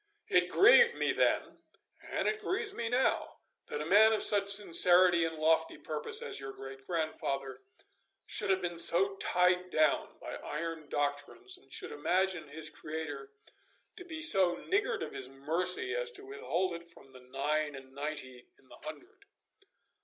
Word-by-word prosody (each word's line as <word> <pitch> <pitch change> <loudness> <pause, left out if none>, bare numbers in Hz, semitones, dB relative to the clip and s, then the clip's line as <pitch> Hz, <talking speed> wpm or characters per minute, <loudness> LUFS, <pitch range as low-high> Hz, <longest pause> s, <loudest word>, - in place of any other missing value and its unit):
It 180 0 +3
grieved 475 - +6
me - - 0
then, - - 0 0.4
and - - -3
it 430 - -1
grieves 415 +1 -2
me 230 -1 -4
now, 250 +2 0 0.3
that 150 - -5
a - - -7
man 215 +6 +5
of 215 - +1
such 200 -1 +4
sincerity 180 -3 +6
and 160 0 -5
lofty 160 +1 +1
purpose 150 -1 -5
as - - -4
your 135 0 -7
great 135 0 -11
grandfather 150 -5 -3 0.6
should - - -1
have 190 -1 +1
been 175 -1 -2
so 190 +4 +4
tied 180 0 +1
down 155 -3 0
by - - -7
iron 160 -1 -6
doctrines, 145 - -3
and 375 - -22
should - - -5
imagine 185 - -1
his 155 +2 -2
Creator 150 -3 -7 0.7
to - - -10
be 320 -3 -6
so 190 - +3
niggard 405 - -1
of - - -7
His 130 -1 -6
mercy 170 - -2
as - - -1
to 400 -2 -7
withhold 190 - -3
it 170 0 -9
from 165 - -17 0.3
nine 150 +2 -1
and 135 0 -13
ninety 140 -3 -7
in 130 - -28
the - - -14
hundred. 360 +6 -11
175 Hz, 160 wpm, -31 LUFS, 150-220 Hz, 0.7 s, grieved